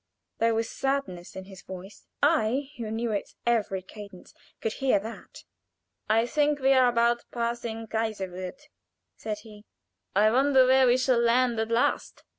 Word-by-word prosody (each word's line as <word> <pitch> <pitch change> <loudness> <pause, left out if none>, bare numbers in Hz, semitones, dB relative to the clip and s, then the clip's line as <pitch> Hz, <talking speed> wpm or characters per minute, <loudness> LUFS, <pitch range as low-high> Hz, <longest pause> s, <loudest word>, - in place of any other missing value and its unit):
There 230 0 +2
was 225 0 0
sadness 270 -11 -3
in 190 - -7
his 190 -1 -12
voice. 190 +2 -11 0.2
I, 280 -2 +2
who 230 -3 -5
knew 225 +1 -2
its 205 - -4
every 210 -5 0
cadence, 200 -1 -12 0.3
could 225 - -2
hear 270 -4 +2
that. 220 +4 -9 0.7
"I 225 +2 +3
think 295 +3 +1
we 270 0 +4
are 255 -2 +5
about 235 0 +1
passing 235 -1 -3
Kaiserswerth," 215 +2 -4 0.5
said 215 -1 -4
he. 210 -2 -14 0.5
"I 215 +2 +5
wonder 265 +1 +4
where 260 0 +5
we 245 +1 +4
shall 255 -1 +2
land 235 0 +2
at 220 0 -1
last." 230 +1 0
230 Hz, 155 wpm, -27 LUFS, 210-255 Hz, 0.7 s, are